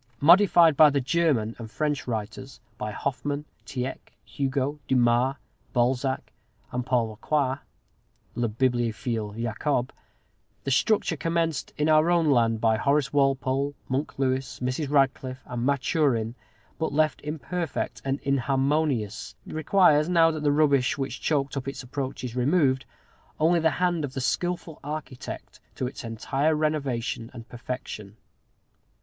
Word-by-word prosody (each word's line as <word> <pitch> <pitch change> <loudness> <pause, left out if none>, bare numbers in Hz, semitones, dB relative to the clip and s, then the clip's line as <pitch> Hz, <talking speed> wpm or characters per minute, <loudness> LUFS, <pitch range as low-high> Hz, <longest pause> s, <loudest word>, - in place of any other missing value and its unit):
Modified 170 -1 +6
by 150 +2 +8
the 140 -1 +1
German 130 -6 +1
and 115 -1 -7
French 150 +3 -2
writers 120 +3 -5 0.2
by 105 - -3
Hoffman, 145 +6 -3 0.2
Tieck, 130 0 -5
Hugo, 140 +1 -2
Dumas, 125 +1 +3 0.4
Balzac, 130 +2 0 0.4
and 125 0 -2
Paul 120 -3 +1
Lecroix 135 +4 0 0.7
(le 120 0 0
Bibliophile 115 -2 -1
Jacob) 120 +3 -1 0.7
the 135 - -2
structure 190 +4 +2
commenced 165 -2 -1
in 150 - +1
our 155 +1 +5
own 170 -4 +3
land 115 -3 +3
by 110 -1 +3
Horace 140 +3 +1
Walpole, 135 0 +1
Monk 135 +3 -2
Lewis, 130 0 -1
Mrs. 130 +3 -2
Radcliffe, 135 -2 +1
and 120 0 -3
Maturin, 135 -5 +1 0.5
but 160 - -1
left 155 +1 +1
imperfect 160 +2 -4
and 135 +1 -1
inharmonious, 135 -4 0
requires, 155 -1 +3
now 165 -2 +5
that 155 -1 -4
the 145 -1 +2
rubbish 145 -4 +3
which 135 -1 -4
choked 140 -3 0
up 135 -1 -4
its 135 - -5
approach 130 0 -5
is 125 -1 -5
removed, 135 0 +2 0.5
only 170 +2 +4
the 160 0 +3
hand 175 -3 +1
of 135 -2 -5
the - - -1
skilful 175 +4 -2
architect 145 -3 -7 0.2
to 130 - -2
its 125 - -6
entire 135 +7 0
renovation 135 -7 -1
and 115 -1 -9
perfection. 115 -4 -7
135 Hz, 135 wpm, -26 LUFS, 125-150 Hz, 0.7 s, by